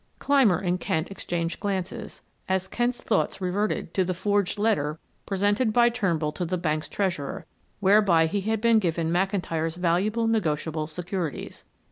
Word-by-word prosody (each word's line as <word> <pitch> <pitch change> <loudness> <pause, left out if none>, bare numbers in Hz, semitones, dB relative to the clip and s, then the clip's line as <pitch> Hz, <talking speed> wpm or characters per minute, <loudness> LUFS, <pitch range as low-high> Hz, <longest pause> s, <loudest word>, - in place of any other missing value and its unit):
Clymer 265 -11 +4
and 180 -1 -1
Kent 160 +2 -2
exchanged 170 -3 -3
glances, 190 -3 -4 0.3
as 190 0 0
Kent's 240 +4 -1
thoughts 220 - 0
reverted 195 +3 -1
to 190 - +2
the 185 0 -2
forged 205 +2 0
letter 200 -9 +1 0.3
presented 205 +4 +1
by 240 +1 +5
Turnbull 175 -10 0
to 180 - -4
the 180 +2 -1
bank's 155 -3 -2
treasurer, 180 -3 -2 0.4
whereby 195 -4 +5
he 195 +5 -1
had 220 +2 -1
been 230 -1 +5
given 165 -4 -1
McIntyre's 175 -3 0
valuable 185 +6 +1
negotiable 160 -7 0
securities. 175 -2 -5
185 Hz, 145 wpm, -26 LUFS, 165-210 Hz, 0.4 s, by